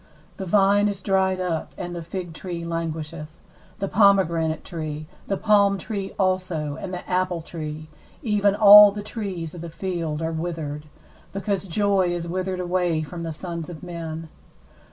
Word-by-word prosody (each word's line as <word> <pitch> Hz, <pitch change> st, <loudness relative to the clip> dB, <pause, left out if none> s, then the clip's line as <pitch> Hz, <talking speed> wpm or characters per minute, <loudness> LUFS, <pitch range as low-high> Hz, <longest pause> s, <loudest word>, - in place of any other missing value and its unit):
12The 190 Hz, -, -4 dB
vine 205 Hz, +2 st, +4 dB
is 200 Hz, -2 st, -2 dB
dried 190 Hz, -1 st, +1 dB
up, 175 Hz, -3 st, -2 dB
and 175 Hz, -, -5 dB
the 170 Hz, -, -4 dB
fig 175 Hz, 0 st, -6 dB
tree 170 Hz, 0 st, -5 dB
languisheth; 160 Hz, -1 st, -5 dB, 0.4 s
the 195 Hz, -, -2 dB
pomegranate 175 Hz, -6 st, +3 dB
tree, 155 Hz, -2 st, -5 dB, 0.2 s
the 195 Hz, -, 0 dB
palm 200 Hz, -2 st, +4 dB
tree 200 Hz, -1 st, -5 dB
also, 185 Hz, -6 st, 0 dB
and 185 Hz, -, -5 dB
the 180 Hz, -1 st, -6 dB
apple 180 Hz, -2 st, 0 dB
tree, 155 Hz, -2 st, -6 dB, 0.4 s
even 205 Hz, -3 st, +2 dB
all 210 Hz, -1 st, +10 dB
the 205 Hz, 0 st, -6 dB
trees 195 Hz, -7 st, -5 dB
of 175 Hz, -, -8 dB
the 170 Hz, -, -6 dB
field, 165 Hz, -3 st, -3 dB
are 160 Hz, -, -1 dB
withered: 160 Hz, -3 st, -4 dB, 0.5 s
because 195 Hz, 0 st, -2 dB
joy 195 Hz, 0 st, +2 dB
is 175 Hz, -1 st, -2 dB
withered 185 Hz, +1 st, -2 dB
away 175 Hz, -3 st, 0 dB
from 170 Hz, +3 st, -7 dB
the 165 Hz, -1 st, -3 dB
sons 170 Hz, 0 st, -5 dB
of 160 Hz, -4 st, -9 dB
men. 165 Hz, -2 st, -6 dB
175 Hz, 160 wpm, -24 LUFS, 165-195 Hz, 0.5 s, all